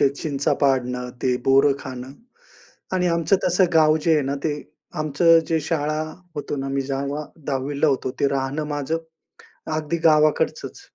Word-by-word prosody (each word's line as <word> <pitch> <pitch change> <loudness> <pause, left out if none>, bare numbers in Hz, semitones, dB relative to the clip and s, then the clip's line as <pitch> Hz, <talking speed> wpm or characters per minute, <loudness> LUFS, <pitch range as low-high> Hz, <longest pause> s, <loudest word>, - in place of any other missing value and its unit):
ते - - +5
चिंचा 145 -2 -1
पाडणं, 125 -2 +1
ते 125 -1 +2
बोरं 135 +1 +5
खाणं 130 0 -8 0.8
आणि 180 -1 +1
आमचं 170 +3 +2
तसं 180 +1 +3
गाव 155 -1 +5
जे 165 - +4
आहे 150 - +2
ना, 140 +1 -2
ते 155 - +1 0.5
आमचं 165 +3 +4
जे 160 -1 +1
शाळा 155 -2 0 0.4
होतो 145 0 -3
ना, 135 0 -3
मी 135 0 -1
जेव्हा 140 +2 -2 0.2
10वीला 140 +2 0
होतो. 130 -1 0
ते 140 - +3
राहणं 135 +2 -2
माझं 145 +3 -2 0.8
अगदी 155 +2 -2
गावाकडचंच. 155 -1 +1
145 Hz, 155 wpm, -22 LUFS, 135-155 Hz, 0.8 s, ते